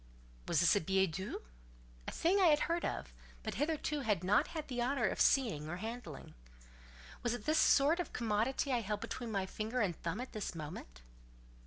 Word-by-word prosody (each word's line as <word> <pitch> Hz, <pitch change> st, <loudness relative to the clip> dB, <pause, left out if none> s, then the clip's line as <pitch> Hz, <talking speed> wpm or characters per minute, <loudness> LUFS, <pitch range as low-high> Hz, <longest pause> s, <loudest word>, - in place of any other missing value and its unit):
Was -, -, +3 dB
this 170 Hz, -, +5 dB
a 205 Hz, -, +2 dB
billet 190 Hz, +1 st, +2 dB
doux? 190 Hz, -, -5 dB, 0.6 s
A -, -, -2 dB
thing 365 Hz, +5 st, +2 dB
I 375 Hz, -, +6 dB
had 300 Hz, -2 st, +5 dB
heard 340 Hz, +1 st, 0 dB
of, -, -, -3 dB, 0.3 s
but -, -, -3 dB
hitherto 300 Hz, -1 st, 0 dB
had 210 Hz, -9 st, 0 dB
not 200 Hz, +3 st, +3 dB
had 315 Hz, -2 st, -5 dB
the 245 Hz, -2 st, -2 dB
honour 250 Hz, -1 st, +1 dB
of -, -, 0 dB
seeing 210 Hz, -, +3 dB
or 175 Hz, -, -3 dB
handling. 220 Hz, -, -7 dB, 0.9 s
Was 240 Hz, 0 st, 0 dB
it 215 Hz, -, -9 dB
this 310 Hz, +1 st, +3 dB
sort 295 Hz, +5 st, +5 dB
of 355 Hz, -, -3 dB
commodity 235 Hz, +5 st, 0 dB
I 245 Hz, -2 st, +2 dB
held 210 Hz, -1 st, -3 dB
between 240 Hz, -3 st, -5 dB
my 195 Hz, -2 st, 0 dB
finger 220 Hz, +5 st, -3 dB
and 195 Hz, -7 st, +1 dB
thumb 170 Hz, +7 st, -4 dB
at 255 Hz, -, -5 dB
this 210 Hz, -4 st, -4 dB
moment? 145 Hz, -, -8 dB
225 Hz, 195 wpm, -35 LUFS, 190-275 Hz, 0.9 s, I